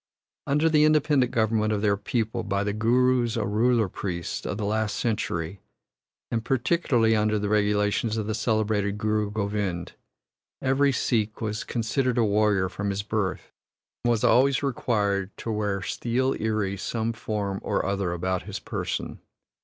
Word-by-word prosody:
Under 150 +3 +3
the 155 -2 +4
independent 150 -4 +3
government 110 -2 +1
of 105 -1 -1
their 100 -1 +3
people 110 +3 -2
by 100 -2 -1
the 105 0 -1
Gurus, 120 +1 +2
or 105 - 0
ruler 115 +1 +2
priests, 90 -2 -4
of - - -3
the 105 - -2
last 110 0 -1
century, 95 -5 -2 0.7
and 115 -1 -1
particularly 120 -3 +2
under 105 0 +2
the 105 0 -2
regulations 105 +1 +1
of 110 - -1
the 110 - -2
celebrated 110 -2 0
Guru 105 0 0
Govind, 100 -4 -2 0.7
every 135 +1 +2
Sikh 110 -4 0
was 105 -1 -3
considered 125 +2 -1
a 120 - +4
warrior 105 -2 +2
from 100 +2 -4
his 100 +1 -2
birth, 105 -3 -2 0.5
and 120 - +2
was 115 -3 +1
always 135 +2 +4
required 105 -7 -1
to 115 - -4
wear 105 -2 -1
steel 125 +6 0
iri 105 -3 -1
some 115 +3 -2
form 105 -3 -3
or - - -1
other 100 -2 -1
about 90 +1 -1
his - - -6
person. - - -4
110 Hz, 155 wpm, -26 LUFS, 100-120 Hz, 0.7 s, the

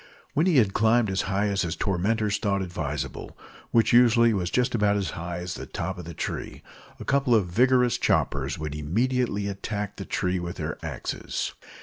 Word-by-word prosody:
When 160 +5 +2
he 170 -6 +4
had 105 -6 +4
climbed 110 -1 +3
as 95 - +1
high 100 +2 +1
as 100 -1 0
his 85 -2 -2
tormentors 105 +2 0
thought 100 -3 0
advisable 80 -5 -5 0.3
which 115 0 +3
usually 115 -1 +6
was 90 -3 -1
just 125 +3 +1
as 100 -5 +1
high 85 +1 -5
as 90 0 -4
the - - -7
top 95 -1 -4
of 90 - -7
the 85 -1 -8
tree - - -5 0.4
a - - -7
couple 135 -3 +3
of 105 -4 +3
vigorous 125 +6 +3
choppers - - +1
would 75 -1 -4
immediately 105 - 0
attack 100 0 -4
the - - -6
tree 90 0 -1
with 85 +1 -5
their 80 -1 -5
axes. - - -4
100 Hz, 185 wpm, -26 LUFS, 90-115 Hz, 0.4 s, usually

